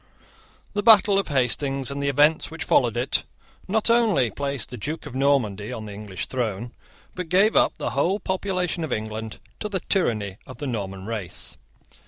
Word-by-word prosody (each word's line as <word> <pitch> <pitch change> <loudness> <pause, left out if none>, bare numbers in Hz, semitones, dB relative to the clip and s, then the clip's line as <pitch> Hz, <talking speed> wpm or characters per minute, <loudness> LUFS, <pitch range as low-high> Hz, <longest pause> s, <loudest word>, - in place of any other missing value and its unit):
The 205 - 0
battle 205 -3 +6
of 200 - -2
Hastings, 135 0 +1
and 140 0 -4
the 140 - +1
events 150 +3 +3
which - - -5
followed - - +3
it, - - +1 0.4
not 215 +2 +1
only 220 - +3
placed 140 -1 -3
a - - -5
Duke 150 +10 -4
of 145 - -8
Normandy 130 -7 +1
on 110 - -5
the 105 - -7
English 100 -6 -6
throne, 120 -2 -3 0.4
but 180 -3 -5
gave 195 +5 +4
up - - +3
the - - -2
whole 175 +9 +1
population 185 -3 -1
of 160 - -4
England 110 0 -4 0.2
to 210 - -3
the 190 -3 -2
tyranny 105 - 0
of 130 - -10
the 145 - -5
Norman 95 -6 -4
race. 105 -6 -5
140 Hz, 180 wpm, -24 LUFS, 110-180 Hz, 0.4 s, battle